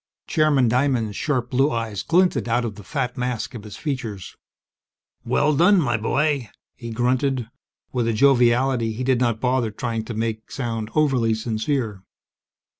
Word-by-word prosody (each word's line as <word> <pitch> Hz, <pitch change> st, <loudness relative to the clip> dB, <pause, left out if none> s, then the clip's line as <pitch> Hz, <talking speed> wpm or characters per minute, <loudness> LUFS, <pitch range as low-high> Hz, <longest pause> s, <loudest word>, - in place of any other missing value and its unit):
Chairman 150 Hz, -5 st, +3 dB
Diamond's 120 Hz, -3 st, +1 dB
sharp 125 Hz, -3 st, -1 dB
blue 135 Hz, +3 st, +3 dB
eyes 115 Hz, -4 st, -3 dB
glinted 180 Hz, -6 st, +2 dB
out 120 Hz, +1 st, +1 dB
of 110 Hz, -, -3 dB
the 105 Hz, 0 st, -12 dB
fat 130 Hz, 0 st, -3 dB
mask 125 Hz, 0 st, -2 dB
of 115 Hz, -4 st, -8 dB
his 105 Hz, -2 st, -9 dB
features. 115 Hz, -, -5 dB, 0.9 s
"Well 150 Hz, +1 st, +2 dB
done, 180 Hz, +6 st, +5 dB
my 130 Hz, -7 st, +1 dB
boy!" 135 Hz, +3 st, 0 dB, 0.2 s
he 115 Hz, -, -8 dB
grunted, 125 Hz, +1 st, 0 dB, 0.4 s
with 120 Hz, -3 st, 0 dB
a 115 Hz, -, +1 dB
joviality 120 Hz, -1 st, +3 dB
he 120 Hz, +4 st, -4 dB
did 130 Hz, -1 st, +2 dB
not 120 Hz, -3 st, +1 dB
bother 125 Hz, -2 st, +1 dB
trying 115 Hz, +1 st, -3 dB
to 115 Hz, -, -6 dB
make 110 Hz, 0 st, -3 dB
sound 115 Hz, -4 st, -3 dB
overly 130 Hz, -7 st, +2 dB
sincere. 110 Hz, -1 st, -2 dB
120 Hz, 155 wpm, -23 LUFS, 115-135 Hz, 0.9 s, done